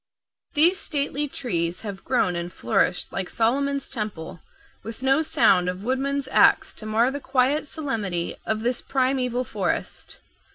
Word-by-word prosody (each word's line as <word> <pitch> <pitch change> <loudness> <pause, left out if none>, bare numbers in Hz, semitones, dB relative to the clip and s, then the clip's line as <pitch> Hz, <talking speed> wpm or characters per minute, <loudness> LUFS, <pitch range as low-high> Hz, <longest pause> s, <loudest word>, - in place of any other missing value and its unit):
These 340 +5 +5
stately 290 0 -1
trees 175 -11 -2
have 200 -3 -7
grown 235 -9 +1
and 170 +1 -4
flourished 195 -2 0
like 190 -2 -3
Solomon's 275 +4 0
Temple 210 -9 -5 0.4
with 225 +4 -8
no 270 +3 +4
sound 180 - +3
of 180 +2 -5
woodman's 270 +3 -1
axe - - +4
to 215 - -8
mar 230 +4 +2
the 285 - -4
quiet 275 +3 +1
solemnity 215 - -3
of 220 0 -1
this 245 +2 0
primeval 255 -2 0
forest. - - -3
250 Hz, 140 wpm, -24 LUFS, 195-275 Hz, 0.4 s, These